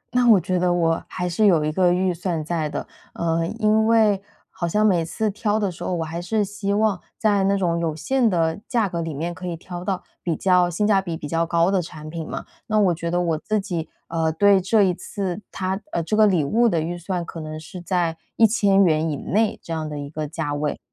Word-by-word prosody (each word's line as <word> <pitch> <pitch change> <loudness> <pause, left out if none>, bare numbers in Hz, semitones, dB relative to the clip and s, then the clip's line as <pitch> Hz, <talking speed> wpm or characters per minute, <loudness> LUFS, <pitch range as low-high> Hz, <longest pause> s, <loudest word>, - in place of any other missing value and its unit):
那 250 -1 +4
我 215 -4 +7
觉 180 +1 -1
得 180 0 +2
我 165 -2 +1
还 180 -1 -3
是 190 +5 +2
有 165 -6 +4
一 155 - 0
个 180 +2 +3
预 180 +1 +1
算 170 -2 -3
在 160 -2 -1
的。 - - -5 0.3
呃， 165 0 0
因 220 0 +3
为 215 -3 +4 0.3
好 170 - -3
像 210 +5 +2
每 180 -5 +3
次 215 +6 -2
挑 210 +1 0
的 200 -3 0
时 175 - -9
候， - - -2
我 165 - -1
还 165 +2 -5
是 210 +3 0
希 200 0 -3
望 210 -3 +1 0.2
在 205 -4 +2
那 200 +1 +2
种 170 -3 0
有 165 -2 -1
限 240 - +1
的 165 -3 0
价 230 -5 +1
格 170 -2 -3
里 165 -1 -3
面， 165 +5 -3
可 180 +2 -7
以 175 - -3
挑 175 +1 -8
到 185 -1 -2 0.2
比 170 -2 -1
较 180 +1 +3
性 175 +5 -1
价 200 -2 +4
比 170 -4 -4
比 150 - -6
较 165 +2 0
高 170 +1 +2
的 190 -2 +2
产 155 -2 -9
品 165 -1 -5
嘛。 - - -5 0.2
那 215 -1 +2
我 190 -4 +4
觉 170 +1 -4
得 175 +1 +1
我 165 -3 0
自 215 +5 -1
己， 175 -5 -4 0.2
呃， 165 -1 0
对 200 +4 +4
这 205 +3 +3
一 185 -2 +3
次 190 +1 -4
它 190 +1 -2
呃， 170 - -1
这 215 - -1
个 215 0 +6
礼 180 -6 +2
物 235 +10 +3
的 170 - +1
预 165 +3 -2
算， 175 0 -3
可 165 - -8
能 155 0 -6
是 175 +4 -9
在 175 -2 0 0.2
￥1000 195 -8 +4
以 150 - -1
内， 215 +8 0
这 165 - -5
样 155 -1 -3
的 150 - -5
一 140 0 -6
个 155 -1 -4
价 145 -1 -3
位。 145 0 -2
175 Hz, 260 characters per minute, -23 LUFS, 165-200 Hz, 0.3 s, 我